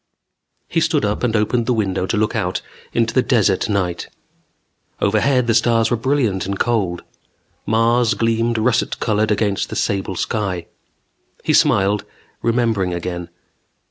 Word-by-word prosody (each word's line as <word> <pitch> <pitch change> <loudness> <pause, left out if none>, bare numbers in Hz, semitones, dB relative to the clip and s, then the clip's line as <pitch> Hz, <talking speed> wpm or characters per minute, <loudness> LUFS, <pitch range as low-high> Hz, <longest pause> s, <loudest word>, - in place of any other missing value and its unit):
He - - 0
stood - - +1
up 105 0 -1
and 120 -3 0
opened 115 +2 +1
the 125 - +2
window 95 -3 -1
to 110 - -1
look 105 0 0
out - - -2 0.3
into 115 -1 0
the 130 - +4
desert 110 -6 +1
night. 90 -4 -1 0.9
Overhead 120 +5 +2
the 115 - +2
stars 115 0 +2
were - - +3
brilliant 115 -6 0
and 100 0 -2
cold. 100 -8 0 0.6
Mars 115 +2 +2
gleamed 115 0 0
russet 115 +1 0
colored 110 -1 +1
against 105 -2 0
the - - -5
sable 95 -1 -1
sky. 95 -2 -2 0.8
He - - +1
smiled, 100 +1 +3 0.4
remembering 115 -6 +1
again. 85 0 -5
110 Hz, 140 wpm, -19 LUFS, 100-115 Hz, 0.9 s, the